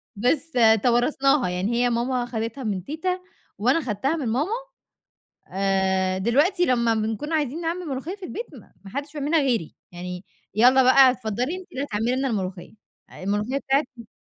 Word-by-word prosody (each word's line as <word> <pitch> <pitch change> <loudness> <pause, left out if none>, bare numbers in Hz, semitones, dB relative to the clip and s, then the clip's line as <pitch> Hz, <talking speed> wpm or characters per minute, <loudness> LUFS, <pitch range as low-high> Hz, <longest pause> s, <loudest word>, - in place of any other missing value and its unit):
بس 275 +9 0 0.3
توارثناها 255 0 +2
يعني، 185 +6 -1
هي 245 +1 +2
ماما 245 +1 0
أخدتها 235 +2 -4
من 195 -5 -2
تيتا، 360 - -2 0.4
وأنا 255 +10 +2
أخدتها 265 +4 -1
من 280 -7 -3
ماما، 280 - 0 1.0
آآ 190 -1 +1
دلوقتي 290 - +2
لما 235 -2 +2
بنكون 220 +9 -2
عايزين 300 +1 -1
نعمل 345 +2 -3
ملوخيّة 285 +8 -4
في 395 - -9
البيت 460 +6 -5
ما 195 -5 -15
حدش 285 +2 -5
بيعملها 300 +2 +1
غيري، 245 - -1 0.2
يعني 180 +1 -7 0.3
يالّا 255 +4 +6
بقى 260 0 +7
اتفضلي 250 - -3
أنتِ 375 0 -11
اللي 275 - -3
هتعملي 225 +2 -1
لنا 270 +1 0
الملوخيّة، 190 -5 -4 0.5
الملوخيّة 210 +7 -1
بتاعتي 270 -5 -1
250 Hz, 150 wpm, -24 LUFS, 210-290 Hz, 1.0 s, بقى